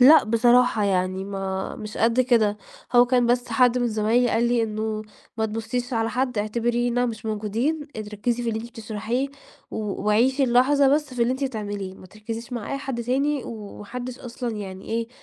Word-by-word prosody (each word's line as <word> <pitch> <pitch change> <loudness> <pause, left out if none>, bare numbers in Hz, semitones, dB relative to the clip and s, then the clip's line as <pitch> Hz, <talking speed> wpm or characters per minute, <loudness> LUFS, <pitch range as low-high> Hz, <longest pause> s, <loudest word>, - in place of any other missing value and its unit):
لأ 295 +6 +8
بصراحة، 235 0 +4
يعني 185 -1 0
ما 195 -1 -4
مش 210 0 -7
قد 230 +2 +3
كده، 230 -5 +3 0.4
هو 245 0 +7
كان 245 -1 +3
بس 245 +1 +1
حد 245 +1 +4
من 245 -1 +1
زمايلي 225 +3 +2
قال 225 +2 +2
لي: 240 -1 +2
"إنه 215 0 -2 0.3
ما 220 -1 +1
تبصيش 225 +3 -3
على 225 -1 0
حد، 250 -3 -1
اعتبرينا 240 +3 +1
مش 225 -1 -5
موجودين، 225 +9 -1
أنتِ 215 -1 -5
ركِّزي 240 +3 -1
في 235 - -2
اللي 220 -1 -1
أنتِ 235 - -8
بتشرحيه، 225 +3 -3 0.4
و - - -5 0.3
وعيشي 260 +6 +3
اللحظة 265 +3 +4
بس 295 -3 -2
في 240 - +1
اللي 235 +2 +2
أنتِ 265 +2 -2
بتعمليه 205 -6 -4
ما 185 - -13
تركزيش 225 +5 -7
مع 235 +1 -4
أي 275 - -1
حد 265 -3 -4
تاني، 275 +4 0
وما 210 -2 -8
حدِّش 250 +3 -6
أصلًا 240 -2 -5
يعني 190 -2 -7
إيه 230 0 -2
235 Hz, 190 wpm, -24 LUFS, 215-250 Hz, 0.4 s, لأ